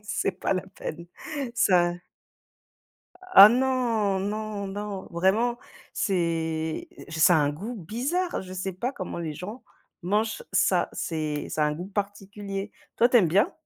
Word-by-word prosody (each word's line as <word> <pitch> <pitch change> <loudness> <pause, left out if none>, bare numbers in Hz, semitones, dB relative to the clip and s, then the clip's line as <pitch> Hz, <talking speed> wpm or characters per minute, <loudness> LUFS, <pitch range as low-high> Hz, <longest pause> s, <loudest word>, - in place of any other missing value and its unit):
C'est 205 - -1
pas 185 - -1
la 185 0 -3
peine. 170 +2 -6 0.5
Ça 180 -6 +4 1.4
Ah 200 - +11
non, 235 -5 +1
non, 210 0 -3
non, 200 0 -5
vraiment. 210 +8 +1 0.3
C'est 165 -4 -1 0.2
je 160 - -6
s 160 - +1
ça 175 +1 +7
a - - +4
un 145 - +2
goût 205 +12 -6
bizarre, 255 - -2
je 185 0 -10
sais 185 +1 -3
pas 235 +9 -3
comment 185 -7 -6
les 160 -3 -4
gens 210 - -8 0.4
mangent 215 - 0
ça, - - +3
c'est 155 -3 -3
ça 155 - 0
a - - +3
un - - -1
goût 170 +5 -6
particulier, 200 0 -5 0.2
toi, 235 - +5
tu 250 - +4
aimes 180 - +3
bien? 190 +6 +3
195 Hz, 160 wpm, -26 LUFS, 170-215 Hz, 1.4 s, Ah